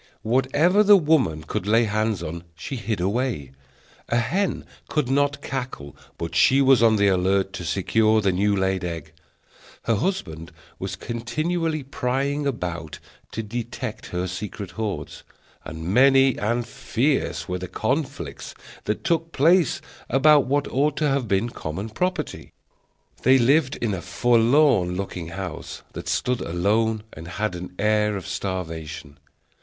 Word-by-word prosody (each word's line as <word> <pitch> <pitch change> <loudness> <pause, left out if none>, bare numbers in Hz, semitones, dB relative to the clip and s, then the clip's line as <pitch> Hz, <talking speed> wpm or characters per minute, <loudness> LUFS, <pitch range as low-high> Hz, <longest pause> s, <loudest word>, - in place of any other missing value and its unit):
Whatever 135 - +3
the 205 -1 +7
woman 145 - +2
could 90 +4 -4
lay 115 +3 +4
hands 110 -3 0
on 85 +1 -5
she 85 +11 -6
hid 110 -3 -3
away; 100 - -1 0.6
a 120 - +2
hen 175 - 0 0.2
could 150 -5 0
not 145 +1 +1
cackle 125 - -5 0.2
but 85 0 -5
she 130 +11 +5
was 135 -3 +5
on 115 -1 +5
the 100 -1 +3
alert 95 +1 +2
to 90 - -5
secure 110 +6 +2
the 100 -3 +2
new 100 +3 +1
laid 95 -1 0
egg. 85 -3 -5 0.7
Her 115 - +1
husband 90 - -2 0.3
was - - -4
continually 155 +7 -2
prying 140 +2 -1
about 85 - -4 0.4
to 110 - -3
detect 115 +2 -5
her 90 0 -2
secret 95 +1 -6
hoards, 105 0 -4 0.4
and 80 +2 -7
many 135 +6 +5
and 120 +3 0
fierce 135 +5 -1
were 90 0 -3
the 95 - -5
conflicts 130 - -3 0.3
that 105 - -2
took 165 -1 0
place 165 +2 +3 0.3
about 145 +1 +5
what 145 +2 +1
ought 145 +2 +1
to 150 -2 +2
have 135 -3 0
been 100 +4 +1
common 95 +6 -5
property. 180 +12 -3 0.7
They 130 +1 +6
lived 130 +3 +3
in 115 -4 -2
a 90 - -3
forlorn 120 -6 +3
looking 90 -3 -4
house 85 - -6
that - - -7
stood 125 -1 0
alone 105 +5 0
and 80 +2 -9
had 105 +3 -2
an 90 +1 -7
air 105 -1 +2
of 95 - -7
starvation. 80 -6 -5
110 Hz, 145 wpm, -24 LUFS, 90-135 Hz, 0.7 s, the